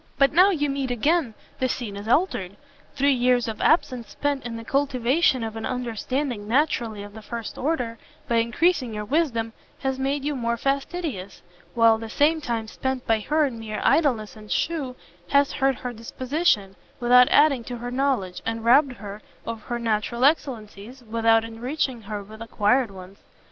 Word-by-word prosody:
But 275 0 +4
now 365 +5 +7
you 300 -7 0
meet 275 -2 -2
again 250 +1 +1 0.2
the 255 - +1
scene 225 -6 -4
is 200 +2 -7
altered; 225 - +1 0.4
three 280 0 +3
years 245 -1 +2
of 220 -1 -5
absence 255 -8 +2
spent 285 -1 -2
in 230 -1 -5
the 230 - -7
cultivation 270 0 +2
of 220 -1 -5
an 225 - -5
understanding 250 -1 -3
naturally 230 -5 0
of 205 0 -11
the 220 - -10
first 230 +1 -6
order, 250 -6 -2 0.3
by 235 - +1
encreasing 245 +1 +1
your 210 0 -4
wisdom, 235 -5 0 0.3
has 265 -1 -1
made 275 +1 -1
you 295 -1 -1
more 235 -2 -1
fastidious; 275 - -3 0.3
while 230 -1 +5
the 225 0 -7
same 310 +6 +2
time 235 -5 -2
spent 260 +3 -3
by 225 -1 +2
her 305 +8 +1
in 245 -5 -4
mere 215 -1 -5
idleness 245 -10 +2
and 215 -1 -12
shew, 290 -7 -1 0.3
has 280 0 +4
hurt 270 -1 +1
her 250 0 -6
disposition, 230 - -1 0.2
without 250 +1 +6
adding 285 -5 +4
to 245 - -5
her 245 +1 -6
knowledge, 250 -9 -1
and 225 0 -3
robbed 265 +3 +5
her 205 -2 -9 0.2
of 230 -1 -5
her 240 +3 -4
natural 235 +2 0
excellencies, 245 -4 -1
without 225 0 +3
enriching 245 +2 -3
her 210 -1 -6
with 215 +2 -13
acquired 230 +2 +1
ones. 190 0 -12
245 Hz, 175 wpm, -24 LUFS, 225-275 Hz, 0.4 s, now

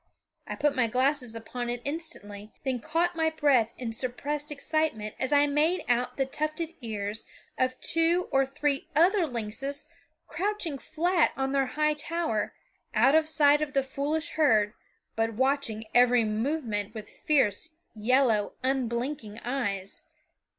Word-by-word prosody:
I - - -4
put 295 -1 +1
my 250 -3 +3
glasses 255 0 +1
upon 240 +2 -5
it 240 0 -2
instantly, 215 -9 -6
then 260 -3 -1
caught 335 +6 0
my 320 -1 +2
breath 280 -8 +3
in 235 -3 -4
suppressed 285 +5 -3
excitement 290 -7 -1
as 260 - -1
I 290 0 +5
made 310 +5 +1
out 245 +1 0
the 270 - +2
tufted 310 +4 -3
ears 215 -2 -4 0.3
of 255 0 0
two 335 +2 +2
or 270 0 +4
three 280 +1 -1
other 350 +3 +4
lynxes 260 +4 -4 0.4
crouching 345 -4 -2
flat 335 +4 +1
on 270 0 -1
their 275 -1 +2
high 305 0 +3
tower, 300 -7 -2 0.4
out 245 +6 +5
of 315 0 +4
sight 295 -1 +4
of 295 -2 -2
the 275 -1 +2
foolish 300 +4 -2
herd, 220 -11 +3 0.4
but 225 0 0
watching 260 -4 0
every 245 -1 +5
movement 220 -2 -2
with 215 -1 -7
fierce, 295 +1 0 0.2
yellow, 225 -1 +2
unblinking 245 -3 -2
eyes. 200 -7 -2
270 Hz, 145 wpm, -28 LUFS, 230-305 Hz, 0.4 s, I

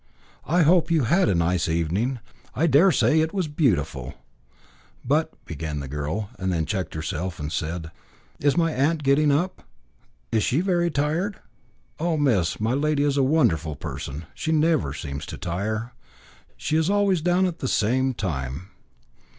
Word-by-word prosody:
"I 175 +2 +3
hope 165 +1 +4
you 160 -4 +3
had 170 - +3
a 95 - +2
nice 85 0 +1
evening. 90 +11 0 0.4
I 160 - +2
dare 170 +5 +5
say 160 0 +3
it 160 +4 0
was 185 -4 0
beautiful." 85 - 0 0.9
"But," 155 +5 +2 0.2
began 80 -2 -4
the 70 - -6
girl, 75 +9 -3
then 90 -4 0
checked 95 -5 -3
herself, 85 +3 -4
and 75 +1 -4
said 80 0 -3 0.5
"Is 145 +3 +2
my 165 -2 +2
aunt 150 +4 +1
getting 140 +2 +4
up? 175 +7 0 0.7
Is 110 - +2
she 130 +7 +1
very 175 -2 +1
tired?" 160 +7 -1 0.6
"Oh, 165 0 0
miss, 115 - +1
my 110 +3 0
lady 145 +1 +1
is 145 -1 +1
a - - +4
wonderful 85 - +2
person; 70 +3 -6
she 160 - -3
never 155 - +2
seems 70 0 -6
to - - -6
tire. 110 +7 -3 0.7
She 155 - 0
is 160 +2 +1
always 200 -4 +2
down 180 +3 +2
at 175 -2 -3
the 130 - -2
same 130 +4 +1
time." 75 -3 -4
130 Hz, 160 wpm, -24 LUFS, -, 0.9 s, dare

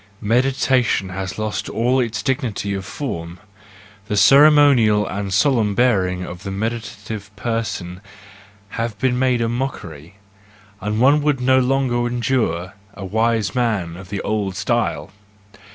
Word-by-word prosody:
—Meditation 125 -2 +1
has 95 0 -5
lost 110 0 -3
all 125 +4 +1
its 120 -3 -2
dignity 125 -7 -2
of 95 -1 -4
form; 85 - -5 0.7
the 105 - -1
ceremonial 135 -6 +6
and 100 0 -4
solemn 105 -1 +2
bearing 95 -7 +1
of 85 0 -9
the 100 - -6
meditative 105 0 -5
person 100 -5 -4 0.7
have 115 0 -4
been 125 +2 0
made 125 -2 +2
a 115 - +1
mockery, 100 - -5 0.7
and 105 +2 -2
one 140 +4 +4
would 145 -2 +1
no 130 +1 +3
longer 125 -2 +1
endure 115 -8 -1 0.2
a 100 -1 -7
wise 110 +2 0
man 110 -9 -1
of 90 +1 -11
the 100 -1 -3
old 100 -3 -2
style. - - -1
110 Hz, 135 wpm, -20 LUFS, 100-125 Hz, 0.7 s, ceremonial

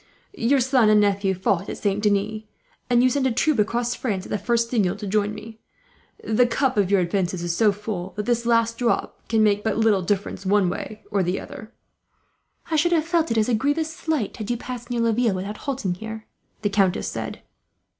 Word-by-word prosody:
Your 275 -5 +2
son 255 -3 +3
and 215 0 +6
nephew 200 -1 +2
fought 190 +1 0
at - - -5
Saint 205 0 -1
Denis; 210 +1 0 0.5
and 245 0 +4
you 255 - +5
sent 265 0 +1
a - - 0
troop 265 +2 +1
across 235 +3 +1
France, 200 -7 -3
at - - -10
the 210 - -1
first 230 +3 0
signal, 205 -7 +1
to - - -7
join 205 +1 0
me. 220 +1 -10 0.6
The 230 +3 +3
cup 260 +2 0
of 200 -3 +2
your 200 -2 +4
offences 180 0 -1
is 170 -1 -1
so 215 +3 +4
full 200 -3 -5
that 210 0 -3
this 235 -1 0
last 230 0 +2
drop 240 -2 -1
can 225 -1 +2
make 205 -1 +2
but 220 -2 0
little 220 -4 +3
difference, 195 +2 -2
one 195 -2 +2
way 215 +3 -7
or 200 -2 +2
the 180 +1 -1
other." 215 +1 -10 1.0
"I 315 - +2
should 345 +3 +3
have 320 -2 +2
felt 335 -1 +1
it 230 - 0
as 215 - +3
a 245 - +1
grievous 290 +7 0
slight, 315 - -2
had 215 -1 -6
you 240 - 0
passed 245 0 -7
near 240 -1 -1
Laville 230 -2 +2
without 200 +3 -5
halting 250 -9 -1
here," 220 +3 -8 0.4
the 205 - +1
countess 195 -2 +1
said. - - -5
215 Hz, 215 wpm, -23 LUFS, 200-240 Hz, 1.0 s, and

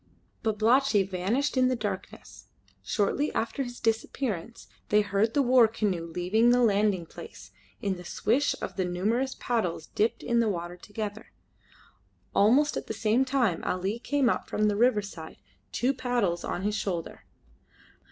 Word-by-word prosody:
Babalatchi 220 0 +3
vanished 195 +11 -1
in 255 -1 +4
the 255 - +1
darkness. 205 -5 -6 0.4
Shortly 250 +8 0
after 230 +5 -1
his 245 -2 -5
disappearance 225 -2 -2 0.2
they 210 - +5
heard 205 +2 0
the 285 - +4
war 250 -2 +6
canoe 200 -7 -2
leave 175 +2 -5
the 240 +3 +5
landing 205 -4 +2
place - - -11 0.3
in 195 -2 -1
the 180 - -9
swish 250 +10 +1
of - - -5
the 190 - +1
numerous 220 +9 -1
paddles 180 -10 -1
dipped 230 +2 0
in 235 -1 +1
the 230 -2 +2
water 175 -2 -4
together. 210 +3 -7 1.0
Almost 265 +9 +4
at - - -5
the 220 - -4
same 225 +5 +2
time 250 -10 +1
Ali 190 +5 -2
came 280 +1 +1
up - - 0
from 210 0 +1
the 205 - 0
riverside, 205 -8 0 0.3
two 255 +3 +1
paddles 240 -9 -1
on 180 - -3
his 210 +1 0
shoulder. 180 -6 -4
215 Hz, 150 wpm, -28 LUFS, 195-245 Hz, 1.0 s, war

